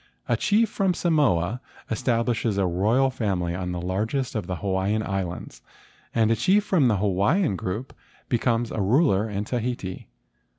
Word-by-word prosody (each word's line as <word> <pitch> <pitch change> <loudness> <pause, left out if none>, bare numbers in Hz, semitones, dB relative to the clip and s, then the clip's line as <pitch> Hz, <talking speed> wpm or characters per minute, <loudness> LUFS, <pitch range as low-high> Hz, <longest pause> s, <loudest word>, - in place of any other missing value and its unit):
A - - +2
chief 220 +2 +2
from 195 -3 0
Samoa 125 - +1 0.3
establishes 115 -2 0
a 100 - +2
royal 110 +10 +2
family 95 -8 -1
on 90 0 -3
the 90 - -3
largest 110 +9 -2
of 105 -6 -3
the 90 - -2
Hawaiian 95 +4 -1
Islands, 95 -5 -4 0.5
and 115 -1 +3
a - - +4
chief 190 - +3
from 175 -10 +3
the 110 -4 +2
Hawaiian 100 - +1
group 95 +8 -4 0.3
becomes 120 -1 0
a 110 - -2
ruler 110 - +3
in 100 0 -2
Tahiti. 120 -5 -4
110 Hz, 155 wpm, -25 LUFS, 95-130 Hz, 0.5 s, a